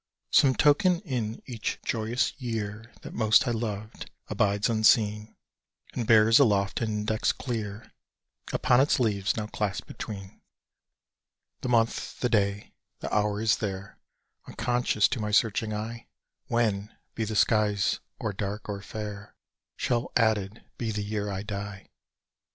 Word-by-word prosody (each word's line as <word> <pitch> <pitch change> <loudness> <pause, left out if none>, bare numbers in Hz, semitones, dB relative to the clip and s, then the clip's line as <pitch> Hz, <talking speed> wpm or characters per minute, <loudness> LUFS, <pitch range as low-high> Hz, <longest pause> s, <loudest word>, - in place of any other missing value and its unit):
Some 130 -2 +5
token 170 +4 +4
in 120 - -3
each 120 -5 -3
joyous 115 +2 0
year 110 -1 -4
That - - -8
most 110 0 +4
I - - +2
loved, 110 -2 -4 0.2
abides 100 0 +1
unseen, 110 -1 +3 0.6
And 115 - -3
bears 110 +1 +6
aloft 100 -7 +2
an 115 - 0
index 105 0 0
clear 110 -4 -5 0.6
Upon 125 +1 +4
its 140 - +2
leaves 105 -4 +1
now 110 - -2
clasped 105 -2 -3
between. 100 -3 -8 1.2
The 125 - -4
month, 115 -1 +1
the 125 - +1
day, 100 -2 0 0.3
the - - -5
hour 105 -1 +1
is 110 0 +3
there, 100 -2 -5 0.5
Unconscious 120 -4 +1
to 130 - -2
my 105 -1 -2
searching 110 +1 +2
eye 110 +2 -5 0.4
When, 105 -3 0 0.2
be 115 - -2
the 110 0 -3
skies 105 -1 +2 0.2
or 105 - -2
dark 100 +2 -4
or 100 -2 -4
fair, 105 0 -7 0.4
Shall 120 0 -1
added 110 -2 +1 0.2
be 115 - -2
the 105 -1 -2
Year 105 0 -2
I 95 0 -3
die! 100 -2 -6
110 Hz, 140 wpm, -27 LUFS, 105-115 Hz, 1.2 s, bears